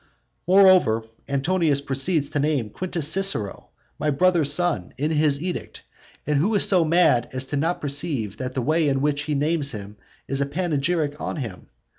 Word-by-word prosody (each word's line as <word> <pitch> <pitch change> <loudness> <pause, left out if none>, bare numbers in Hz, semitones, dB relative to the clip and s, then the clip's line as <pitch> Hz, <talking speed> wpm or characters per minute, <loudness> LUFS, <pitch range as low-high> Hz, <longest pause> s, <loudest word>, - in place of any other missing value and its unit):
VII. 180 - +1
Moreover, 185 - +5 0.3
Antonius 145 +1 +1
proceeds 140 +2 -1
to 150 - -1
name 140 -7 -1
Quintus 175 -2 -3
Cicero, 175 - 0 0.3
my 150 - -1
brother's 160 0 +3
son, 155 - +1
in 150 +4 -1
his 150 -1 +1
edict; 180 -1 -6 0.4
and 150 0 +1
is 200 - +6
so 185 -4 +3
mad 160 -7 +2
as 130 +1 -4
not 160 +5 0
to - - -21
perceive 140 - -1
that 130 0 -6
the 130 - -2
way 155 +2 +1
in 135 -1 -1
which 145 0 0
he 150 -1 -2
names 145 -1 0
him 105 -1 -9 0.3
is 135 0 -1
a 140 - 0
panegyric 155 -1 -2
on - - -4
him. 115 - -7
145 Hz, 175 wpm, -23 LUFS, 135-170 Hz, 0.4 s, is